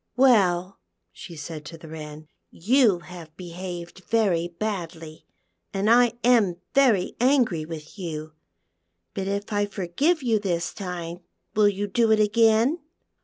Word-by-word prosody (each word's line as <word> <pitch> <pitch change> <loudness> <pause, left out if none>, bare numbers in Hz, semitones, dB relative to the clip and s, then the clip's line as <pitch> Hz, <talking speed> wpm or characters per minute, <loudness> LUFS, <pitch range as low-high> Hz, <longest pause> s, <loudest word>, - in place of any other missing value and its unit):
" - - -53
Well, 195 -8 +3 0.2
' 95 - -55
she 95 - -11
said 150 0 -7
to 165 +2 -9
the 160 - -13
Wren, 155 -1 -9 0.2
" - - -53 0.2
you 235 -10 +5
have 170 -3 -12
behcived 175 0 -8
very 195 -7 +1
badly, 170 -4 -6 0.5
and 200 +3 +2
I 245 0 +5
am 225 -7 +4 0.2
very 245 -9 +3
angry 240 - +2
with 160 +3 -9
\ - - -13
ou; 155 -3 -5 0.8
but 190 0 -3
if 200 +1 -3
I 205 0 +1
forgive 215 - 0
you 225 -3 +2
this 175 -4 -2
time 175 -3 -6 0.4
will 210 -1 +5
you 205 0 -2
do 225 +3 +2
it 220 - +4
again 225 +7 +3
190 Hz, 155 wpm, -25 LUFS, 170-220 Hz, 0.8 s, you